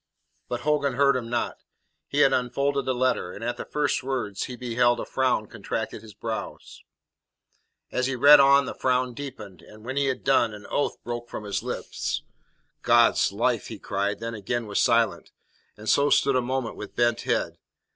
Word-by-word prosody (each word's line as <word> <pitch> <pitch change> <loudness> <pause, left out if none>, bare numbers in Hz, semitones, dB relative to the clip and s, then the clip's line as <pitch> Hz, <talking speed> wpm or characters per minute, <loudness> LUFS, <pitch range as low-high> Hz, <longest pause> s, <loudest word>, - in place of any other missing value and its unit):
But 120 0 -3
Hogan 145 -2 +1
heard 140 0 +4
him 120 -2 -3
not. 120 0 -2 0.5
He 145 - +1
had 135 -2 +5
unfolded 140 +2 0
the 130 - 0
letter, 125 -8 0
and 110 - -9
at 120 +1 -2
the - - -6
first 150 -1 0
words 125 -7 -3
he 125 - -7
beheld, 120 0 +1
a - - -4
frown 130 -4 0
contracted - - -5
his 110 -2 -14
brows. 115 -1 -6 1.1
As 125 0 0
he 135 - -2
read 145 +4 +8
on 140 0 +6
the - - -5
frown 125 -1 0
deepened, 110 - -9
and 110 +1 -15
when 130 +2 -4
he 140 - +2
had 130 - -2
done, 120 -5 +2
an 105 0 -12
oath 145 - 0
broke 120 0 -5
from 105 - -6
his 100 -1 -2
lips. - - -4 0.6
"God's - - +4
life!" - - 0
he - - -7
cried, 100 +1 -2
then 115 +1 -5
again 115 +3 -3
was 105 -1 0
silent, 115 0 +2 0.5
and 105 +1 -11
so 145 +4 +4
stood 140 -2 +3
a 130 - +3
moment 130 -1 -3
with 105 - -8
bent 120 -1 +2
head. - - -1
125 Hz, 185 wpm, -25 LUFS, 115-135 Hz, 1.1 s, read